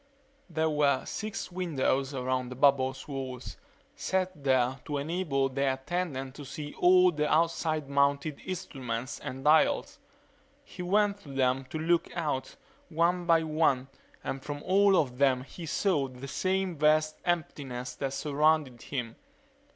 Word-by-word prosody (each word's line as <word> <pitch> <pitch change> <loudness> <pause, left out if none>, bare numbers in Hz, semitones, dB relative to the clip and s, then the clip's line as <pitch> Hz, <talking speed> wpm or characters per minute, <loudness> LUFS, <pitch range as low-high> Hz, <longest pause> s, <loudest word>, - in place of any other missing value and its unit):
There 160 -1 0
were 145 -3 +2
six 215 -3 -5
windows 140 -6 0
around 130 -1 -1
the 125 - -7
bubble's 135 0 +2
walls, 130 -3 -6 0.4
set 185 -1 0
there 130 -1 +2
to 145 - -2
enable 145 -2 0
the 135 0 0
attendant 135 -2 -3
to 145 - -9
see 145 +2 -7
all 180 0 +6
the 150 -2 -1
outside 160 -2 +1
mounted 140 +1 +1
instruments 130 -9 -4
and 135 +1 -6
dials. 160 - +3 0.6
He 185 - -10
went 200 +2 +2
to 155 - -14
them 135 -1 +1
to 130 - -6
look 165 +2 +1
out, 150 -6 -2 0.3
one 170 +2 +1
by 165 -1 +5
one, 155 -4 +1 0.3
and 135 - -4
from 145 0 -5
all 195 +1 +4
of 125 -5 0
them 130 -2 +3
he 165 +5 -9
saw 155 -4 +1
the 130 +1 -9
same 185 +3 -1
vast 155 +1 +3
emptiness 140 -8 -2
that 135 -1 -3
surrounded 150 -4 +1
him. 120 -5 -5
145 Hz, 145 wpm, -29 LUFS, 130-170 Hz, 0.6 s, all